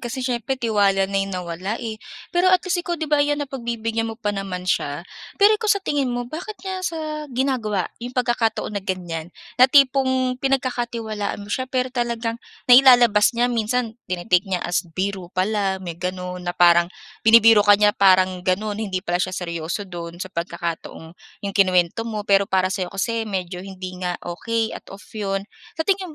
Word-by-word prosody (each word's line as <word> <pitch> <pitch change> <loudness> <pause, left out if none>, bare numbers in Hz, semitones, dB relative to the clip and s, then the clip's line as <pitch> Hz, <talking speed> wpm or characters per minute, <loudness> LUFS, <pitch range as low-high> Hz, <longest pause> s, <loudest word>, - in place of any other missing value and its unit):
kasi 250 +1 -4
siyempre 250 +1 -1
tiwala 205 -5 +2
na 195 0 -3
'yong 195 - -2
nawala, 180 +4 -4
eh. 225 -2 -6 0.3
Pero, 355 +1 +3
at 370 0 +3
least, 355 -1 0
ikaw, 345 0 -3
'di 315 - -3
ba, 295 -1 +2
ayan 290 0 +2
napagbibigyan 235 -5 -3
mo 225 - -6
pa 210 -3 -2
naman 195 -2 -5
siya. 155 -2 -1 0.3
Pero 410 +2 +6
ikaw, 435 - -1
sa 390 - -7
tingin 280 -3 0
mo, 245 0 -2
bakit 345 - -7
niya 375 -1 -3
sa 310 -3 -4
ginagawa 240 -7 -1 0.2
'yong 250 +2 -7
pagkakataon 235 -3 0
na 200 - -2
ganyan, 175 -4 -4 0.3
na 255 - +8
tipong 260 -2 +3
pinagkakatiwalaan 240 -5 -2
mo 205 - -6
siya, 260 0 -2
pero 255 -1 -1
talagang 235 -1 -2 0.2
nailalabas 245 -4 +7
niya 240 - +3
minsan, 230 +1 -1 0.2
tini-take 180 +1 +1
niya 180 -2 -2
as 175 -1 +1 0.2
biro 190 -2 -2
pala, 195 0 0
may 170 -1 -7
gano'n, 180 0 -4
na 175 0 -4
parang 175 -1 +5 0.3
binibiro 225 -1 +7
ka 205 0 +6
niya, 210 0 +4
parang 185 -2 +4
gano'n, 205 +4 -1
hindi 190 -3 -3
pala 175 +1 0
siya 185 0 -2
seryoso 170 +2 -4
do'n 170 -2 -8
sa 185 +1 -7
pagkakataong, 170 -1 -4 0.5
'yong 200 0 -4
kinuwento 185 +3 +2
mo, 215 -2 -3
pero 200 -1 +3
para 185 -2 +1
sa'yo, 185 -1 -2
kasi 225 +3 -1
medyo 185 -3 -4
hindi 185 -1 -8
nga 180 -1 -2
okey 225 +6 -2
at - - -9
off 200 - -13
'yon. 195 -2 -2 0.3
Sa 320 - -1
tingin 370 -3 -1
215 Hz, 180 wpm, -22 LUFS, 185-250 Hz, 0.5 s, na